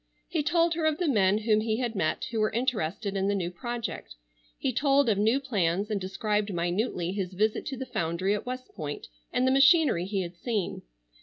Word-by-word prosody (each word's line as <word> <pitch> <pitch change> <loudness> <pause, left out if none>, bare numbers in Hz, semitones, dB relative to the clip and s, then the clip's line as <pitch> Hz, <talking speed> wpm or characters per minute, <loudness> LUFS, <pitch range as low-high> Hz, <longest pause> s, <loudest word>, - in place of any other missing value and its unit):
He 330 -3 -1
told 335 +2 +2
her 320 -1 0
of 310 -1 +1
the 355 - 0
men 205 -7 +3
whom 215 0 +2
he 220 0 0
had 240 -2 -2
met 190 +4 -1
who 225 - -1
were 215 0 +3
interested 210 -5 -1
in 195 0 0
the 200 - +1
new 175 -3 -2
project. 230 - -5 0.4
He 260 - -1
told 280 +1 +3
of 205 -3 +2
new 225 +6 +3
plans 205 -6 0
and 205 -2 -1
described 205 +2 -1
minutely 175 +1 -1
his 190 -2 -3
visit 210 +3 0
to 270 - -4
the 265 - -4
foundry 185 -4 -1
at 210 - -4
West 255 0 -6
Point 145 -5 -5 0.3
and 250 - +1
the 260 - +3
machinery 275 - +5
he 195 -1 -1
had 175 0 -8
seen. 210 +1 -2
215 Hz, 210 wpm, -28 LUFS, 190-255 Hz, 0.4 s, machinery